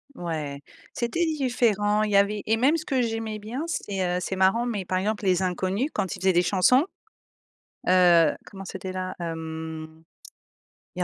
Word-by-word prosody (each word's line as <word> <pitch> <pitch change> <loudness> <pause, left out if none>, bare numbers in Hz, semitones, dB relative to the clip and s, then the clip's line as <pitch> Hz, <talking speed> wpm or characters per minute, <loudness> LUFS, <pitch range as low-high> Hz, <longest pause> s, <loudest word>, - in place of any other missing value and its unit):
Ouais, 155 - -4 0.3
c'était 295 +9 -1
différent. 235 -9 +1
Il 210 - -1
y - - +2
avait 200 +1 +3
et 220 - +2
même 270 +8 +3
ce 315 - -6
que 265 -3 +1
j'aimais 225 -2 -2
bien, 225 +8 -5
c'est, 200 - -3 0.2
heu, - - -1
c'est 190 - -3
marrant, 190 +6 +3
mais, 210 -6 -3
par 185 - -1
exemple, 205 +2 -1
Les 185 -1 +3
Inconnus 185 - -1
quand 190 - -2
ils 190 - -12
faisaient 190 - +4
des 175 - +4
chansons, 205 - +4 1.0
heu, 175 -2 +6 0.2
comment 195 -1 -9
c'était 190 0 -6
là? 185 0 -4
Hem, 160 -1 -6 0.9
il - - -1
195 Hz, 175 wpm, -25 LUFS, 180-225 Hz, 1.0 s, heu